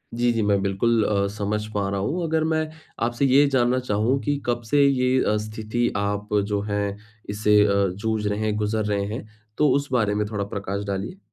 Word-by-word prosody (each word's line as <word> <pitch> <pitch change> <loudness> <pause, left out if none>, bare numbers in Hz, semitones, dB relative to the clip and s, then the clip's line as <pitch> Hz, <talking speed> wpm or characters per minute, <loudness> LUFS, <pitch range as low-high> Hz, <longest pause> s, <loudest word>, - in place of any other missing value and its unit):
जी, 120 0 +2
जी, 115 - 0
मैं 100 -2 +2
बिल्कुल 110 +3 +1
अ, 100 -1 +1
समझ 105 +1 -2
पा 100 -1 0
रहा 100 0 -2
हूँ। 165 - -1
अगर 160 -1 +1
मैं 155 0 0 0.4
आपसे 120 +3 0
ये 135 +2 +5
जानना 130 -2 +2
चाहूँ 120 +3 0
कि 145 -1 0
कब 120 0 0
से 145 +3 +4
ये 130 -1 +2
अ, 105 - +1
स्थिति 110 +2 -2
आप 100 0 -2 0.2
जो 105 -1 -1
है 105 0 0 0.5
इससे 105 0 +3
अ, 100 -1 +2
जूझ 110 0 -2
रहे 105 +1 -1
हैं, 105 -1 0
गुज़र 105 0 -1
रहे 100 -1 0
हैं, 110 -1 -6 0.3
तो 150 -1 +4
उस 140 0 0
बारे 105 -5 +1
में 105 - 0
थोड़ा 100 -1 -2
प्रकाश 100 0 -4
डालिए? 100 - -4
105 Hz, 205 wpm, -24 LUFS, 100-125 Hz, 0.5 s, ये